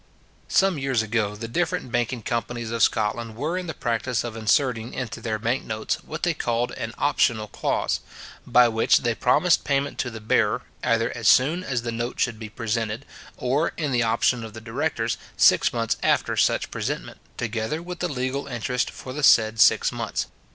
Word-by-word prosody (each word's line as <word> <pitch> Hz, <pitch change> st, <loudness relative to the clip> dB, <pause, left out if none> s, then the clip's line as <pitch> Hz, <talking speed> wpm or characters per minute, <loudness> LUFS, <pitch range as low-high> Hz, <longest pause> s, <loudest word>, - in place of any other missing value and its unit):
Some 190 Hz, -5 st, +2 dB
years 135 Hz, -4 st, +1 dB
ago 105 Hz, -2 st, -1 dB
the 115 Hz, +2 st, -6 dB
different 140 Hz, -1 st, -1 dB
banking 120 Hz, -1 st, -1 dB
companies 115 Hz, 0 st, -3 dB
of 115 Hz, -1 st, -2 dB
Scotland 110 Hz, +2 st, +1 dB
were 150 Hz, +9 st, -2 dB
in 185 Hz, -1 st, -3 dB
the 160 Hz, -, -5 dB
practice 120 Hz, 0 st, -1 dB
of 120 Hz, -2 st, -5 dB
inserting 115 Hz, +1 st, +1 dB
into 125 Hz, -3 st, -5 dB
their 110 Hz, -2 st, -2 dB
bank 120 Hz, +4 st, -1 dB
notes, 110 Hz, 0 st, -2 dB
what 155 Hz, +1 st, -7 dB
they 175 Hz, -2 st, +2 dB
called 120 Hz, -4 st, -1 dB
an 115 Hz, +1 st, -6 dB
optional 115 Hz, -6 st, +1 dB
clause; -, -, -1 dB, 0.5 s
by 125 Hz, -1 st, +6 dB
which 115 Hz, -1 st, +3 dB
they 120 Hz, -2 st, +1 dB
promised 150 Hz, +9 st, +3 dB
payment 140 Hz, +1 st, -1 dB
to 125 Hz, -, -1 dB
the 110 Hz, -1 st, -8 dB
bearer, 110 Hz, -, +1 dB, 0.2 s
either 115 Hz, 0 st, +1 dB
as 115 Hz, -2 st, -1 dB
soon 150 Hz, -, +4 dB
as 130 Hz, -8 st, -2 dB
the 120 Hz, -, -2 dB
note 120 Hz, +2 st, -4 dB
should 115 Hz, -3 st, 0 dB
be 110 Hz, -2 st, -7 dB
presented, 115 Hz, +3 st, -3 dB, 0.3 s
or, 135 Hz, +6 st, 0 dB
in 150 Hz, -4 st, -1 dB
the 120 Hz, -1 st, +2 dB
option 115 Hz, +1 st, +2 dB
of 110 Hz, -1 st, -9 dB
the -, -, -6 dB
directors, 115 Hz, 0 st, -2 dB, 0.2 s
six -, -, +5 dB
months 115 Hz, -2 st, 0 dB
after -, -, +1 dB
such -, -, +1 dB
presentment, -, -, -4 dB, 0.2 s
together 115 Hz, +5 st, -2 dB
with 180 Hz, 0 st, -7 dB
the 180 Hz, -, -1 dB
legal 130 Hz, 0 st, -2 dB
interest 125 Hz, 0 st, -1 dB
for 130 Hz, -, -9 dB
the 150 Hz, -, -4 dB
said 110 Hz, -5 st, +5 dB
six -, -, +5 dB
months. -, -, -3 dB
120 Hz, 185 wpm, -24 LUFS, 115-135 Hz, 0.5 s, by